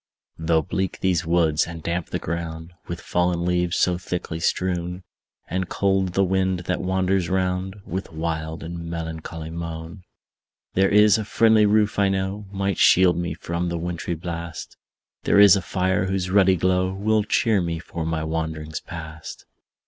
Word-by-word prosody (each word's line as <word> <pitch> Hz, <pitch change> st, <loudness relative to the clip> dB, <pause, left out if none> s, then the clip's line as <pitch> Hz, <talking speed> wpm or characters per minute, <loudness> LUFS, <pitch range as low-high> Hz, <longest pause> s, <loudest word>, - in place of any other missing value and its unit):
Though 80 Hz, 0 st, +2 dB
bleak 95 Hz, 0 st, -3 dB
these 90 Hz, -3 st, +1 dB
woods, 80 Hz, -2 st, +2 dB
and 85 Hz, -2 st, -8 dB
damp 85 Hz, 0 st, -2 dB
the -, -, -2 dB
ground 85 Hz, 0 st, -5 dB
With 85 Hz, 0 st, -5 dB
fallen 90 Hz, -1 st, 0 dB
leaves 90 Hz, -1 st, +1 dB
so 90 Hz, -1 st, +2 dB
thickly 90 Hz, -2 st, -4 dB
strown, 90 Hz, +1 st, -1 dB, 0.4 s
And 95 Hz, +1 st, -2 dB
cold 95 Hz, -2 st, +1 dB
the 95 Hz, -, +4 dB
wind 95 Hz, -1 st, +1 dB
that 90 Hz, +1 st, -2 dB
wanders 95 Hz, -1 st, 0 dB
round 95 Hz, +1 st, -1 dB
With 95 Hz, +3 st, -5 dB
wild 80 Hz, 0 st, -3 dB
and 85 Hz, 0 st, -6 dB
melancholy 80 Hz, -1 st, -6 dB
moan; 85 Hz, +2 st, -6 dB, 0.7 s
There 95 Hz, +1 st, +3 dB
IS 105 Hz, +1 st, +5 dB
a -, -, -2 dB
friendly 110 Hz, 0 st, +4 dB
roof, 105 Hz, 0 st, +2 dB
I 100 Hz, -1 st, +4 dB
know, 95 Hz, +2 st, -2 dB
Might 100 Hz, -2 st, -1 dB
shield 90 Hz, -1 st, +6 dB
me 85 Hz, -2 st, -3 dB
from 85 Hz, +1 st, -3 dB
the 85 Hz, -, -2 dB
wintry 85 Hz, 0 st, -3 dB
blast; 85 Hz, 0 st, -6 dB, 0.5 s
There -, -, +3 dB
is 100 Hz, -1 st, +9 dB
a 100 Hz, -, 0 dB
fire, 95 Hz, 0 st, 0 dB
whose 95 Hz, -1 st, -1 dB
ruddy 95 Hz, -1 st, +5 dB
glow 95 Hz, +1 st, +1 dB
Will 105 Hz, +3 st, +1 dB
cheer 105 Hz, -1 st, +2 dB
me 85 Hz, -1 st, -2 dB
for 85 Hz, 0 st, -6 dB
my 80 Hz, -1 st, -2 dB
wanderings 80 Hz, 0 st, -3 dB
past. 80 Hz, -3 st, -9 dB
90 Hz, 165 wpm, -23 LUFS, 85-95 Hz, 0.7 s, is